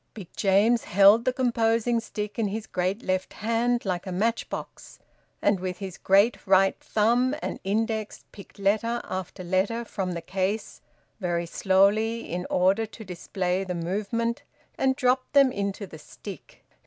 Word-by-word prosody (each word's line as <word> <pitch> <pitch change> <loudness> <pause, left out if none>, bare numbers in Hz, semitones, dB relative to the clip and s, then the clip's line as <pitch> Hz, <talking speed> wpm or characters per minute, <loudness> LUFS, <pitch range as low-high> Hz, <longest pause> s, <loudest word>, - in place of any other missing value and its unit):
Big 195 -6 -9
James 210 +4 +3
held 200 +4 +6
the 255 - +3
composing 235 -2 +1
stick 210 -1 -5
in 220 - +1
his 215 +2 -4
great 185 +6 -2
left 185 0 -1
hand, 230 +2 0
like 180 -1 -2
a - - -3
match 225 +6 -1
box, - - -8 0.5
and 200 -2 +3
with 180 -1 -4
his 190 -2 -7
great 200 +5 +4
right 195 0 +4
thumb 240 +5 +2
and - - -4
index 220 +2 -2
picked 200 - -14
letter 220 +4 +1
after 185 0 -6
letter 195 +6 0
from 190 -5 -3
the 170 - -4
case, 195 +3 -3 0.4
very 175 -3 -1
slowly 200 +6 +2
in 180 +1 -4
order 195 +5 +2
to 220 0 -11
display 180 +1 -2
the 180 -2 -4
movement, 210 +7 -2 0.3
and 265 0 +1
dropped 255 0 +1
them 275 -2 +6
into 200 -1 -3
the 160 -4 -12
stick. 195 +5 -11
205 Hz, 155 wpm, -26 LUFS, 185-230 Hz, 0.5 s, held